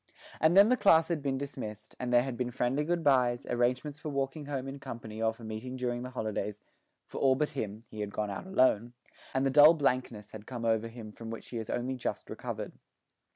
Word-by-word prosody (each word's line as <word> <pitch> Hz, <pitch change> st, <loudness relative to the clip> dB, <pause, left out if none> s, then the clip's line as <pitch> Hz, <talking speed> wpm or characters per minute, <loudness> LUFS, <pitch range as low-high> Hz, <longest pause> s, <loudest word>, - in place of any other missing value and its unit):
And 160 Hz, +4 st, +4 dB
then 200 Hz, +2 st, +8 dB
the 255 Hz, -, +4 dB
class 165 Hz, -6 st, +5 dB
had 165 Hz, -3 st, -1 dB
been 135 Hz, -1 st, -1 dB
dismissed, 110 Hz, -6 st, -7 dB
and 125 Hz, -1 st, -2 dB
there 120 Hz, 0 st, +5 dB
had 130 Hz, -2 st, -4 dB
been 125 Hz, 0 st, -2 dB
friendly 125 Hz, +4 st, 0 dB
good 170 Hz, +1 st, -1 dB
byes, 125 Hz, -4 st, +3 dB
arrangements 125 Hz, +4 st, 0 dB
for 155 Hz, -, -5 dB
walking 140 Hz, +1 st, -2 dB
home 135 Hz, -2 st, -3 dB
in 135 Hz, +1 st, -6 dB
company 110 Hz, -4 st, -7 dB
or 110 Hz, 0 st, +3 dB
for 115 Hz, +1 st, -14 dB
meeting 110 Hz, +4 st, -5 dB
during 120 Hz, -1 st, -2 dB
the 125 Hz, -, -5 dB
holidays 110 Hz, -4 st, -3 dB, 0.5 s
for -, -, -7 dB
all 135 Hz, -1 st, +5 dB
but 150 Hz, +2 st, 0 dB
him; 110 Hz, +1 st, -5 dB
he 110 Hz, -, -10 dB
had 105 Hz, -1 st, -2 dB
gone 105 Hz, -1 st, -2 dB
out 100 Hz, -, -6 dB
alone 120 Hz, -, +3 dB, 0.4 s
and 130 Hz, +1 st, +1 dB
the 135 Hz, -, +2 dB
dull 150 Hz, +4 st, +8 dB
blankness 125 Hz, -7 st, -1 dB
had 110 Hz, -1 st, -10 dB
come 120 Hz, -3 st, -5 dB
over 115 Hz, 0 st, +2 dB
him 115 Hz, -2 st, -9 dB
from 115 Hz, +1 st, -9 dB
which 115 Hz, -, -7 dB
he 120 Hz, -, -5 dB
has 110 Hz, -2 st, -5 dB
only 125 Hz, +2 st, -1 dB
just 125 Hz, -, -4 dB
recovered. -, -, -5 dB
125 Hz, 225 wpm, -31 LUFS, 115-140 Hz, 0.5 s, then